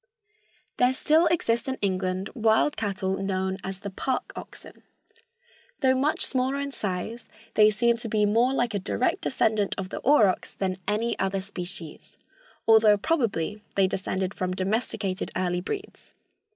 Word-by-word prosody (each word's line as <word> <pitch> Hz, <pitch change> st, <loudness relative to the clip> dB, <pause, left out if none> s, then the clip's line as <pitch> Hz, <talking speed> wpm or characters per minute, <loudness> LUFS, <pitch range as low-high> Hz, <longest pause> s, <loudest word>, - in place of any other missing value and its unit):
There 250 Hz, +1 st, +3 dB
still 315 Hz, +5 st, +4 dB
exist 235 Hz, -9 st, +1 dB
in 265 Hz, 0 st, -2 dB
England 185 Hz, -1 st, -1 dB
wild 225 Hz, +5 st, +2 dB
cattle 195 Hz, -2 st, -2 dB
known 190 Hz, 0 st, -2 dB
as 190 Hz, 0 st, -6 dB
the 200 Hz, -, -5 dB
"park 255 Hz, +6 st, -2 dB
oxen." -, -, -10 dB, 1.0 s
Though 260 Hz, -2 st, +4 dB
much 280 Hz, +4 st, +1 dB
smaller 260 Hz, +1 st, 0 dB
in 280 Hz, 0 st, -3 dB
size, 210 Hz, +1 st, -4 dB, 0.2 s
they 215 Hz, 0 st, +6 dB
seem 235 Hz, +2 st, +2 dB
to 230 Hz, -1 st, -6 dB
be 210 Hz, -1 st, +2 dB
more 230 Hz, +5 st, +3 dB
like 240 Hz, -4 st, 0 dB
a 200 Hz, -, 0 dB
direct 235 Hz, +6 st, 0 dB
descendant 215 Hz, -5 st, +1 dB
of 190 Hz, -2 st, -4 dB
the -, -, -5 dB
aurochs 225 Hz, -9 st, +3 dB
than 185 Hz, -1 st, -2 dB
any 220 Hz, +3 st, 0 dB
other 195 Hz, 0 st, 0 dB
species, 180 Hz, -4 st, -8 dB, 0.5 s
although 220 Hz, -2 st, +6 dB
probably 210 Hz, -, -1 dB
they 195 Hz, -, +4 dB
descended 185 Hz, 0 st, -2 dB
from 185 Hz, 0 st, -2 dB
domesticated 195 Hz, 0 st, -2 dB
early 180 Hz, -1 st, 0 dB
breeds. 400 Hz, -, -7 dB
210 Hz, 150 wpm, -26 LUFS, 190-240 Hz, 1.0 s, they